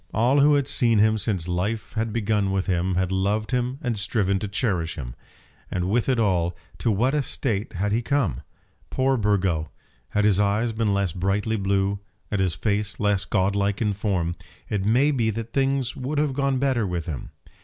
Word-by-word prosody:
All 125 +6 +3
who 145 +1 +5
had 140 -2 +1
seen 120 -6 +3
him 110 +1 +4
since 95 -5 -1
life 105 +5 -2
had 110 0 -1
begun 105 -3 0
with 95 -1 0
him 90 0 0
had 95 0 0
loved 100 +4 0
him 125 +1 0
and 120 -3 0
striven 100 -2 +1
to 105 - -3
cherish 95 -6 -1
him. - - -6 0.6
And 90 +1 -2
with 120 +3 +1
it 130 - +2
all, 90 -6 +1 0.2
to - - 0
what 115 +6 +2
a 150 - +2
state 115 -6 -2
had 100 +3 -1
he 115 +3 +1
come! 120 - 0 0.5
Poor 135 +1 +1
Burgo! 95 -8 +1 0.4
had 105 0 +1
his 100 -2 +4
eyes 105 +3 +1
been 110 -1 0
less 100 -3 +1
brightly 100 +5 0
blue, 100 -1 0 0.3
and 105 -2 0
his 90 -4 0
face 105 -1 -1
less 105 -2 +1
godlike 100 +1 +1
in 105 -3 +1
form, 95 -4 -1 0.4
it 100 -3 -1
may 125 +8 +3
be 120 -6 +1
that 115 +1 -5
things 135 -2 0
would 135 +4 -3
have 145 -2 +1
gone 140 -1 +1
better 130 -5 +1
with 85 -3 -3
him. 75 -7 -5
105 Hz, 195 wpm, -24 LUFS, 95-120 Hz, 0.6 s, who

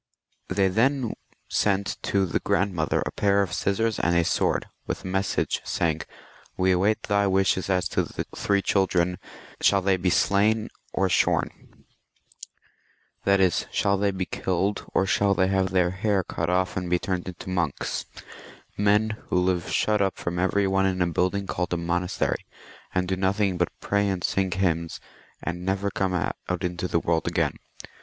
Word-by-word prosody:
They 95 +1 +2
then 120 +5 +1 0.3
sent 100 -1 0
to 100 -1 +1
the 90 - -1
grandmother 90 -4 0
a - - -3
pair 100 0 +2
of 90 - -5
scissors 110 +2 0
and 85 0 +2
a 85 - +4
sword, - - +1 0.2
with - - -3
a - - -6
message, 95 +1 0
saying, 80 -2 0 0.3
" - - -26
"We 95 0 +3
await 100 +4 +2
thy 100 -1 +2
wishes 95 0 +1
as 90 -1 +1
to - - +1
the - - -5
three 100 -1 +1
children; 90 -2 +1 0.4
shall 100 -1 +4
they 95 0 +3
be 90 0 +1
slain 105 +4 +2 0.2
or 95 - +1
shorn? 90 - -1 0.6
" - - -20
that 100 0 +4
is, 95 -3 +2
shall 100 - +2
they 100 +1 +1
be 95 -1 -2
kiUed, 95 +3 -2
or 95 - +2
shall 100 0 +2
they 95 +1 +2
have 95 -1 +1
their 90 -1 +2
hair 95 +1 0
cut 85 0 -3
off, 90 0 +1
and 90 -1 -3
be 90 - +3
turned 90 0 -3
into 90 0 -7
monks 85 -6 -2 0.4
— - - -18
men 105 +1 +2
who - - +1
live 90 -1 +1
shut 105 -1 +1
up 95 -1 0
from 85 0 -3
every 95 +2 +2
one 95 0 +2
in 90 -1 +1
a - - +2
building 90 +4 0
called 90 -2 -2
a - - +1
monastery, 90 +2 -1 0.5
and 90 0 0
do 95 - 0
nothing 95 +1 +1
but - - 0
pray 100 0 +1
and 95 -3 -2
sing 95 -1 +1
hymns, 85 -3 -1 0.4
and 90 +1 -4
never 95 +1 -1
come 95 -1 -1
out 90 - -1 0.3
into 90 0 -2
the 85 - +1
world 80 -1 0
again. - - +1
95 Hz, 180 wpm, -25 LUFS, 90-100 Hz, 0.6 s, a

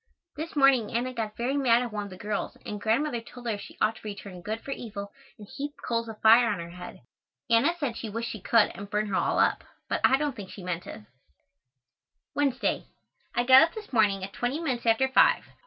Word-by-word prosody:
This 315 +3 -6
morning 270 -6 +4
Anna 245 +2 -1
got 220 -3 -4
very 250 +4 -1
mad 250 -4 +3
at 240 -3 -6
one 205 -1 -3
of - - -9
the 185 - -10
girls 205 +1 -4
and 210 -1 -5
Grandmother 235 +3 0
told 245 +1 -13
her 225 -3 0
she - - -11
ought 220 - +1
to - - -15
return 200 -3 -8
good 215 +5 -4
for 275 - -7
evil 200 -6 -6 0.3
and 210 -2 -12
heap 290 +6 -6
coals 230 -1 -1
of 220 - -9
fire 230 +2 +7
on 205 - -1
her 170 0 -7
head. 180 +1 -10 0.5
Anna 280 +10 +4
said 270 -7 -2
she 225 - -5
wished 230 +3 -4
she 215 - -7
could 225 +2 +3
and 200 +2 -9
burn 210 0 0
her 195 - -1
all - - +1
up, - - +2 0.2
but - - -1
I 265 - +5
don't 290 -2 -2
think 200 -5 -8
she 190 - -10
meant 180 -1 -4
it. - - -8 1.3
Wednesday. 275 -3 0 0.5
I 240 - +2
got 260 +1 +8
up 330 +1 +2
this 430 -8 -9
morning 205 -4 +3
at 195 - -6
twenty 250 +5 -2
minutes 255 -8 -2
after 230 +4 +4
five. 265 - +4
230 Hz, 225 wpm, -27 LUFS, 205-260 Hz, 1.3 s, got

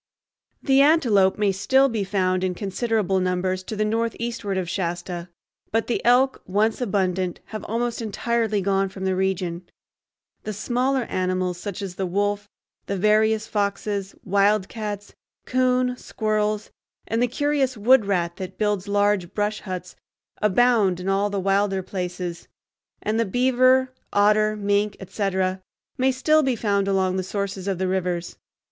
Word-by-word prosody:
The 270 -1 +4
antelope 240 -11 +4
may 205 -2 +2
still 265 +8 +3
be 225 -5 -1
found 185 -1 0
in 185 -1 -1
considerable 200 0 0
numbers 185 0 0
to 215 - -5
the 215 0 0
northeastward 230 -2 -2
of 185 -2 -2
Shasta, 175 -1 -3 0.4
but 225 +1 +1
the 240 - -2
elk, 255 +3 +3
once 215 +5 +1
abundant, 185 -5 0
have 215 -1 -7
almost 235 +1 -2
entirely 220 -1 0
gone 195 0 +1
from 190 0 -6
the 190 0 +1
region. 185 -2 -1 0.8
The 215 - -4
smaller 250 +5 0
animals, 185 -3 -1
such 200 0 -5
as 190 -2 -5
the 190 - -1
wolf, 205 +2 -1 0.4
the 200 - -2
various 215 +2 +3
foxes, 200 -1 -2
wildcats, 205 +1 0 0.3
coon, 255 0 +1
squirrels, 215 -2 -1 0.3
and 225 +2 -1
the 245 - +3
curious 275 -1 0
wood 225 0 +4
rat 175 -3 0
that 185 0 -7
builds 210 -2 0
large 205 -3 +1
brush 210 0 -1
huts, 185 -2 -6 0.5
abound 210 -3 +3
in 185 +1 -3
all 200 +1 +1
the 200 -1 -2
wilder 195 0 +1
places; 180 -2 -5 0.6
and 215 +2 0
the - - +4
beaver, 255 +3 +3 0.2
otter, 215 +1 +3
mink, 205 0 0
etc., 190 -1 -1 0.4
may 260 +1 +3
still 305 +5 +3
be 265 -4 +1
found 200 -3 0
along 190 -1 +1
the - - 0
sources 195 0 -4
of 195 -2 0
the 190 +1 -1
rivers. 180 -2 -2
205 Hz, 150 wpm, -23 LUFS, 190-225 Hz, 0.8 s, The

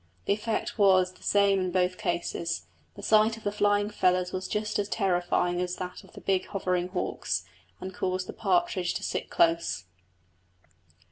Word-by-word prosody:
The - - +3
effect 220 +2 -3
was 185 -2 +5
the 185 - -22
same 200 -1 +3
in 185 -1 -1
both 185 0 +1
cases; 170 - -2 0.3
the - - -10
sight 220 +1 +4
of 225 - -13
the 205 - 0
flying 205 0 +2
feathers 180 -2 +2
was 185 0 -3
just 210 0 -1
as 205 0 -1
terrifying 180 -3 +1
as 180 0 -2
that 180 0 -6
of - - -18
the - - -11
big 190 -1 0
hovering 180 -3 -1
hawks, 180 - -2 0.4
and 190 0 -6
caused 185 0 -2
the - - -7
partridge 185 -3 +1
to - - -3
sit - - -3
close. 165 - +1
185 Hz, 175 wpm, -28 LUFS, 180-205 Hz, 0.4 s, was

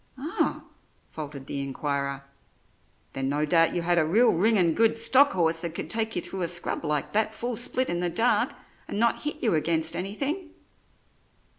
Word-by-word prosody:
"Ah!" 315 +11 -2 0.5
faltered 145 -3 -7
the 140 - -3
inquirer, 140 0 -3 0.9
"then 135 0 -2
no 145 +2 0
doubt 165 +1 +3
you 175 - -1
had 175 0 +3
a - - +4
real 215 +11 +4
ringin' 185 -2 +3
good 225 +4 +3
stock 255 +5 +4
horse 165 -2 +1
that 170 -2 -5
could - - -3
take 225 0 0
you 175 - -1
through 190 - -6
a 170 - 0
scrub 175 0 -3
like 150 -2 -1
that 220 +1 +1
full 240 0 -3
split 250 +2 0
in 175 - -2
the 175 0 0
dark, 230 +8 +2 0.4
and - - -4
not 235 +1 +2
hit 300 +1 -4
you 225 - +2
against 160 0 0
anything." 280 - -3
175 Hz, 180 wpm, -26 LUFS, 160-230 Hz, 0.9 s, a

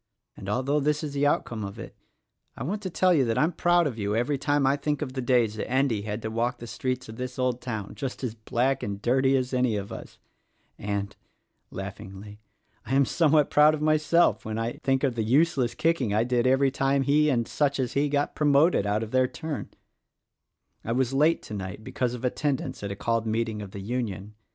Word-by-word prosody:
And, 95 - -8
although 130 +7 +1
this 150 +2 0
is 145 -2 -4
the 145 0 +2
outcome 115 -6 -1
of 100 0 -6
it, - - -9 0.6
I - - -5
want 200 +9 -3
to 190 - -4
tell 185 +1 +3
you 145 -5 +4
that 115 -1 -1
I'm 155 +3 +3
proud 175 +1 +3
of 125 -6 -3
you 100 0 -1
every 130 +5 0
time 145 -1 +1
I 135 +1 +3
think 150 +1 -2
of 130 -3 -6
the 130 - -3
days 120 -4 +2
that - - -4
Endy 130 -4 +1
had 105 +1 -5
to 110 - -3
walk 115 +2 -1
the 120 - -9
streets 125 +1 -3
of 110 0 -10
this 125 0 -5
old 125 -1 0
town 110 -5 -5
just 135 -1 -5
as 120 -4 -2
black 120 +4 -1
and 100 -1 -4
dirtv 130 +4 +2
as 130 0 -2
any 125 -4 +1
o 100 - -2
us - - -10 0.6
And" 100 -1 -3 0.5
laughingly 95 +2 -8 0.4
"I 130 - -2
am 140 0 +5
somewhat 150 0 +3
proud 150 +1 +6
of 150 - -7
myself 155 +2 +3
when 110 0 -4
I 115 +1 -2
think 135 0 +1
of 135 -3 +2
the 115 - -2
useless 130 +1 +2
kicking 140 -11 +1
I 110 - +3
did 120 0 +1
everv 135 +1 +3
time 135 0 +1
he 150 +3 +3
and 120 -4 +1
such 140 -2 0
as 125 -3 -1
he 145 +1 +1
got 145 0 0
promoted 145 - +3
out 105 +2 0
of 110 - -7
their 130 0 +3
turn 155 +2 -6 1.1
1 115 +2 -2
was 130 0 +1
late 155 +5 +3
tonight 100 0 -6
because 125 +2 -2
of 125 - -6
attendance 140 +2 -2
at 100 -1 -4
a - - -4
called 115 +2 -1
meeting 110 -1 -1
of 100 - -7
the 100 +1 -8
Union. 105 -2 -4
125 Hz, 220 wpm, -26 LUFS, 110-145 Hz, 1.1 s, proud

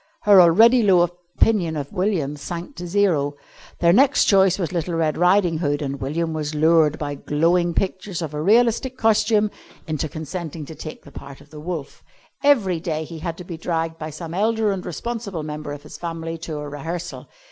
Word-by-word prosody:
Her 200 -3 +8
already 225 +9 +6
low 190 -5 +5
opinion 175 +1 0
of 140 -1 -5
William 180 -7 -1
sank 170 - -7
to 175 - -6
zero. 170 -7 +1 0.5
Their 170 0 +5
next 270 +6 +4
choice 195 -2 +4
was 175 -5 -2
little 170 -1 -2
Red 160 -2 0
Riding 180 -2 +3
Hood, 145 -3 0
and 140 -1 -4
William 160 +4 -2
was 155 -1 -3
lured, 155 0 +4
by 145 -1 -4
glowing 170 +4 +1
pictures 185 -2 -2
of 155 -2 -5
a 150 - -3
realistic 235 - +2
costume, 215 -2 +2 0.3
into 155 -1 -3
consenting 160 0 -6
to 160 - -9
take 155 +1 -9
the 140 - -14
part 140 0 -10
of 145 +1 -19
the 155 - -10
Wolf. 160 -2 -6 0.4
Every 210 - +3
day 160 -2 -3
he 160 +1 -9
had 165 0 -4
to 180 - -8
be 170 -1 -7
dragged 165 -1 -2
by 155 - -5
some 160 +2 -8
elder 215 +2 +1
and 190 -2 -3
responsible 200 -2 -5
member 150 -1 -6
of 145 0 -8
his - - -10
family 165 -1 -5
to 160 -2 -5
a 150 0 -5
rehearsal. 160 +4 -6
170 Hz, 190 wpm, -22 LUFS, 155-190 Hz, 0.5 s, Her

